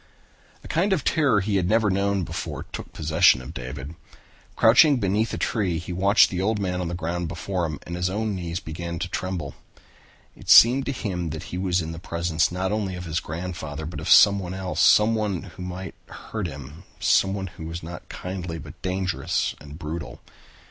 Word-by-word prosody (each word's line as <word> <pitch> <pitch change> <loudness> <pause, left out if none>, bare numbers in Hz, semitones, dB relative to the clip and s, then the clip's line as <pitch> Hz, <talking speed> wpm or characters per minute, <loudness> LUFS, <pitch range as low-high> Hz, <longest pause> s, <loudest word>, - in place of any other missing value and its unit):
A - - -10
kind 190 +5 +1
of 160 -8 0
terror 145 -10 +3
he 100 +1 0
had 90 -1 0
never 110 -2 +3
known 100 0 +1
before - - -5
took - - -7
possession 80 -2 +4
of 65 +5 -9
David. 65 +3 -7 0.6
Crouching 135 +6 +6
beneath 105 +2 +1
a - - -3
tree 95 -7 0
he 90 +2 -5
watched 100 +4 +4
the 95 +4 0
man 90 -3 -2
on 90 - -2
the 85 - -3
ground 85 0 -3
before 90 +2 -3
him 75 -2 -5
and 85 - -5
his 90 +1 0
own 105 +2 -1
knees 85 -2 -4
began 85 +1 -6
to 90 - -3
tremble. 90 -5 -4 0.8
It - - -12
seemed 130 +4 +8
to - - +1
him 90 -9 -3
that 80 +2 -6
he - - -2
was 90 -2 +1
in 80 - -5
the 80 - -7
presence 85 -1 0
not 95 +2 -2
only 105 -3 -2
of 90 0 -7
his 80 +1 -1
grandfather 80 -3 -5
but 85 - -6
of - - -4
someone 95 -3 +6
else, 95 -1 -4
someone 105 -4 +4
who 90 -2 -11
might 90 +1 -6
hurt 110 -5 -5
him, 70 +1 -9 0.2
someone 95 0 +2
who 85 -3 -8
was 85 +1 -6
not 85 +1 -9
kindly 90 -2 -5
but 75 0 -11
dangerous 95 -2 -1
and 75 +1 -10
brutal. 80 -1 -6
90 Hz, 190 wpm, -24 LUFS, 85-100 Hz, 0.8 s, seemed